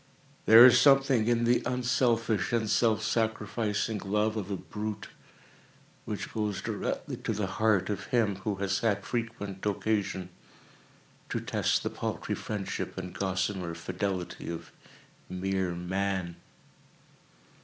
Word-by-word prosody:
There 115 +2 +11
is 125 - +7
something 135 -5 +5
in 120 0 +2
the 120 +1 +3
unselfish 120 -3 +1
and 115 -2 +1
self 110 0 +2
sacrificing 110 -1 -1
love 105 +3 0
of 105 -3 -4
a 100 - -2
brute, 105 +2 -5 1.0
which - - -5
goes 105 -3 -1
directly - - -3
to - - -3
the 105 -1 -1
heart 95 -1 +1
of 105 - -4
him 115 -8 +1
who 100 +1 -2
has 95 0 -1
had 100 -3 0
frequent 115 -5 -4
occasion 100 -3 -1 1.0
to - - -1
test - - 0
the - - -2
paltry - - -3
friendship 105 -3 -4
and 90 - -5
gossamer 95 -2 -2
fidelity 90 +1 -4
of 85 -1 -6 0.6
mere 95 -1 -1
Man. 95 0 -2
105 Hz, 125 wpm, -29 LUFS, 95-115 Hz, 1.0 s, There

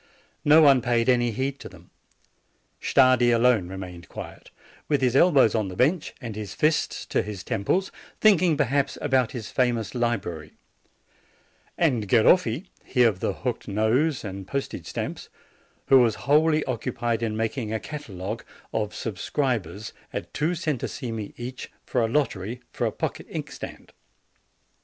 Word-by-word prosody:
No 155 +2 +7
one 135 -3 +6
paid 120 -1 +1
any 120 -1 +3
heed 130 +4 -2
to - - -9
them. 90 -1 -17 0.9
Stardi 130 -2 +4
alone 115 -5 +3
remained 90 -2 -8
quiet, - - -9 0.4
with 145 -2 +2
his 130 -1 +1
elbows 140 - +5
on 110 -3 0
the 90 - -7
bench, 150 - +1
and 115 -5 -6
his 105 -2 -6
fists 155 0 +1
to - - 0
his 105 -3 -6
temples, 180 - 0 0.3
thinking, 185 -7 +4
perhaps, 140 -1 +1
about 130 -5 +1
his 115 -4 -6
famous 120 -4 0
li 120 -1 +1
brary; 80 -6 -8 1.2
and 125 -11 +1
Garom", 120 - +4 0.2
he 125 - +2
of 110 -6 +3
the - - -1
hooked - - -2
nose 120 +9 +1
and 95 -2 -6
the - - -20
post 140 -1 -2
age - - -7
stamps, - - -5 0.6
who 135 - +7
was 115 -4 +3
wholly 155 +1 +3
occupied 120 -2 -2
in 110 -2 -2
making 110 0 -2
a 110 - -1
catalogue 110 -5 -6 0.3
of 105 -2 0
the - - -15
subscribers 110 - -2 0.2
at - - -6
two 160 +4 0
centesimi 120 - -3
each, 125 +2 -7 0.2
for 125 - 0
a 115 - +2
lottery 115 -4 -1
for - - -1
a - - -2
pocket - - -4
inkstand. - - -7
120 Hz, 155 wpm, -25 LUFS, 110-140 Hz, 1.2 s, No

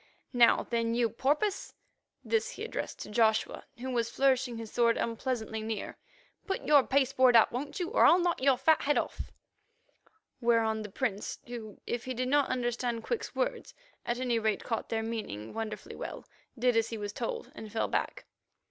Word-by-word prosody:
Now, 240 -1 +5
then, 230 0 +1
you 235 -1 +2
porpoise"—this 395 - -2
he - - -7
addressed - - -4
to - - -7
Joshua, 220 0 +1
who 260 +2 -5
was 235 -2 0
flourishing 260 -2 +1
his 225 -1 -7
sword 235 -1 +3
unpleasantly 230 -2 -2
near—"put 385 - -6
your 295 -2 +6
pasteboard 260 -2 +4
up, 225 - +6
won't 280 - -4
you, 355 - -2
or - - +4
I'll 345 - +7
knock 350 -4 0
your 265 -1 +4
fat 315 +4 +4
head 290 +1 +2
off," - - -3 1.1
whereon 230 -2 +2
the 210 - -6
Prince, 205 -1 -2
who, 230 -4 -8
if 240 0 -3
he 255 0 -3
did 255 +1 -1
not 285 0 +3
understand 240 -2 -1
Quick's 475 - -3
words, - - -2 0.3
at 240 +1 -2
any 245 -3 +1
rate 215 -2 0
caught 225 -2 -3
their 225 -1 -1
meaning 215 - -5
wonderfully 225 -1 -5
well, - - -7 0.3
did 245 0 +2
as 225 0 +2
he 225 - -4
was 205 -1 -5
told, 470 - -4
and 215 -1 -9
fell 225 - 0
back. - - -2
240 Hz, 175 wpm, -30 LUFS, 225-265 Hz, 1.1 s, I'll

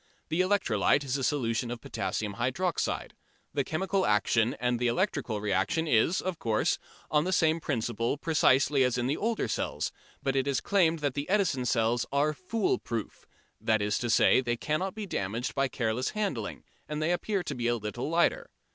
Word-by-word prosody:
The 165 +3 +2
electrolyte 185 - +2
is 135 -1 -2
a 135 - -2
solution 120 -4 0
of 120 0 -4
potassium 100 0 -3
hydroxide. 140 +9 -1 0.4
The 140 - +1
chemical 190 +6 0
action 115 - +2
and 125 +1 0
the 125 - +1
electrical 120 - 0
reaction 105 - 0
is, 150 +7 +3
of 185 -3 -3
course, 110 -2 +1 0.3
on 150 -1 +3
the 185 - -1
same 160 -3 +3
principle 120 -3 -1
precisely 140 -3 +3
as 125 -1 +1
in 120 - 0
the 135 +4 +1
older 225 - -1
cells, 110 - -2 0.3
but 135 0 0
it 135 0 +1
is 140 -2 +1
claimed 165 -5 +2
that 145 -3 0
the 145 +3 -4
Edison 185 -11 +1
cells 115 0 +1
are 145 +2 +2
"fool 190 +6 -1
proof" 115 -3 -5 0.3
that 110 -1 +2
is 105 0 0
to 120 - -2
say, 120 - +5
they 120 -2 -1
cannot 180 - -2
be 215 -1 -4
damaged 115 - -3
by 135 0 +1
careless 120 0 -1
handling, 140 - -2 0.3
and 150 0 -3
they 155 +2 +1
appear 195 +2 -1
to 150 - -4
be 120 -3 -2
a 120 - +2
little 115 +5 -4
lighter. 485 - +1
135 Hz, 185 wpm, -29 LUFS, 115-165 Hz, 0.4 s, say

